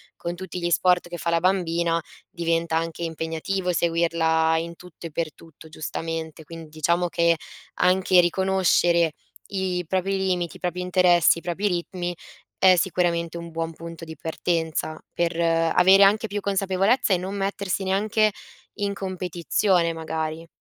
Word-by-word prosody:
con 170 - -4
tutti 180 0 -6
gli 175 - 0
sport 175 0 +2
che 175 - -6
fa 170 - -2
la 170 0 +2
bambina 170 -3 +1 0.3
diventa 165 -1 0
anche 165 +1 -3
impegnativo 165 +3 -2
seguirla 165 -1 +2
in 170 +1 -6
tutto 180 -1 -10
e 160 - -13
per 160 0 -3
tutto, 160 -1 -16
giustamente. 160 0 -5
Quindi 165 0 -10
diciamo 170 +3 0
che 170 0 +3 0.5
anche 185 0 +4
riconoscere 175 -2 +2 0.4
i 185 -2 -2
propri 190 +2 0
limiti, 180 -3 -1
i - - -12
propri 180 0 -3
interessi, 180 -2 +4
i - - -16
propri 180 +4 -2
ritmi 175 -1 -3 0.4
è 185 -1 +6
sicuramente 170 -2 0
un 170 0 -8
buon 165 0 -3
punto 165 0 -9
di 160 0 -9
partenza 160 0 -2 0.2
per 170 -1 -1
avere 170 +3 +4
anche 210 +3 +4
più 205 0 -3
consapevolezza 195 +4 +1
e - - +3
non 190 +3 -5
mettersi 195 -1 -2
neanche 210 +3 +2 0.4
in 205 -1 -2
competizione, 180 -1 0
magari. 160 0 -4
170 Hz, 150 wpm, -24 LUFS, 165-185 Hz, 0.5 s, è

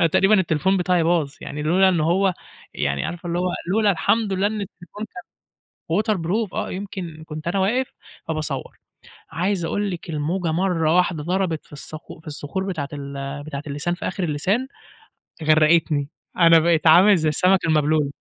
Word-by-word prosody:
أنا 165 - +4
تقريبًا 195 +6 +4
التليفون 185 +2 +1
بتاعي 180 -2 +2
باظ 160 -4 +1
يعني 150 +1 -6
لولا 185 +5 +4
إن 175 -3 +2
هو 180 +4 +2 0.4
يعني 70 -1 -1
عارفة 175 0 -6
اللي 170 0 -1
هو 180 - 0 0.2
لولا 215 0 +3
الحمد 200 +4 +1
لله 190 +2 +1
إن 215 0 -2
التليفون 195 +1 -8
كان 180 -4 -10 0.8
waterproof 210 0 -1
آه، - - -3
يمكن 185 -5 -6
كنت 155 +1 -7
أنا 185 +3 0
واقف 240 +7 0 0.3
فباصوَّر، 155 -4 -3 0.5
عايز 180 0 -1
أقول 205 +4 -1
لِك 175 0 -7
الموجة 165 +3 -1
مرّة 170 -2 +1
واحدة 180 -4 +1
ضربت 180 -2 -1
في - - -23
الصخ 155 +2 -7
في 160 - -18
الصخور 150 +5 -4
بتاعة 155 -7 -3
ال 140 0 -6
بتاعة 145 -1 -6
اللسان 145 +5 -2
في 175 - -4
آخر 190 0 -3
اللسان، 185 - 0 0.8
غرقتني، 155 -2 +3 0.3
أنا 165 -1 +7
بقيت 165 0 +2
عامل 185 +6 +7
زي 160 -2 0
السمك 180 +5 +3
المبلول. 150 -2 +2
170 Hz, 170 wpm, -22 LUFS, 155-190 Hz, 0.8 s, أنا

